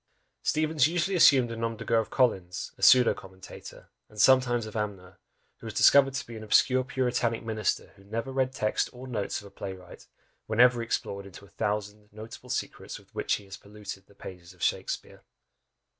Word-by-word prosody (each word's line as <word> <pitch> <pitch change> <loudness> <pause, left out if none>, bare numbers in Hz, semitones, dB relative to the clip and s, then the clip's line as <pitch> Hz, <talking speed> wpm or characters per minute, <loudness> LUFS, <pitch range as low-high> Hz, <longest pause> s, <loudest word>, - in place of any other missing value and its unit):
Steevens 155 -2 +2
usually 175 +4 -1
assumed 130 -8 +6
a - - -4
nom 115 0 -3
de - - -8
guerre 115 -1 +3
of 110 - -3
Collins, 95 -9 0
a - - -19
pseudo 125 -2 +7
commentator, 95 -1 -12 0.2
and 105 - -13
sometimes 120 -1 +4
of 110 - -9
Amner, 100 -4 -5 0.4
who - - -10
was - - -7
discovered 135 -1 +5
to 140 - -3
be 115 - -10
an 110 - -8
obscure 130 +4 +3
puritanic 125 -2 -1
minister 110 -1 -2
who 100 - -18
never 115 +6 -4
read 130 -1 0
text 105 -4 -1
or 125 +1 -10
notes 110 -7 -3
of - - -15
a - - -16
play 95 -1 -6
wright, 90 -2 -14 0.4
whenever 120 +2 +4
he - - -4
explored 100 -3 -3
into 100 +1 -13
a - - -20
"thousand 105 +2 -3
notable 110 +4 -11
secrets" 125 - -4
with - - -20
which - - 0
he 105 - -9
has 95 0 -9
polluted 100 -2 -10
the 100 - -22
pages 90 -3 -11
of - - -10
Shakspeare! - - -2
115 Hz, 195 wpm, -28 LUFS, 100-130 Hz, 0.4 s, pseudo